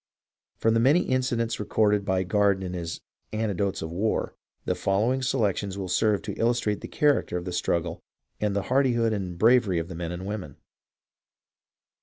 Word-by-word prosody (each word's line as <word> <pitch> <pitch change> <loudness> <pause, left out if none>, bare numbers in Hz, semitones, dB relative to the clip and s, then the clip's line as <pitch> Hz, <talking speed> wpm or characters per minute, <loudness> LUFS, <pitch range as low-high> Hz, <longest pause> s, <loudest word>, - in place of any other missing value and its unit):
From 115 - +2
the 115 - +3
many 140 +9 +5
incidents 120 -3 0
recorded 105 -1 +1
by 95 -1 +1
Garden 100 0 +2
in 90 -1 -4
his 85 -2 -5 0.3
"Anecdotes 100 -4 -1
of 80 - -5
the - - -7
War," 110 +4 0 0.3
the - - +1
following 110 +7 +1
selections 105 -7 0
will 95 -2 -4
serve 105 +2 +1
to - - -4
illustrate 115 -3 +1
the - - -6
character 145 -11 +1
of 90 - -5
the 90 - -4
struggle 85 -1 -1 0.4
and 105 -2 0
the 100 - 0
hardihood 120 -3 +2
and 95 -4 -4
bravery 110 -3 +4
of 85 +1 -3
the 80 - -7
men 85 0 -4
and 90 +2 -6
women. 100 -8 -5
105 Hz, 175 wpm, -26 LUFS, 90-115 Hz, 0.4 s, many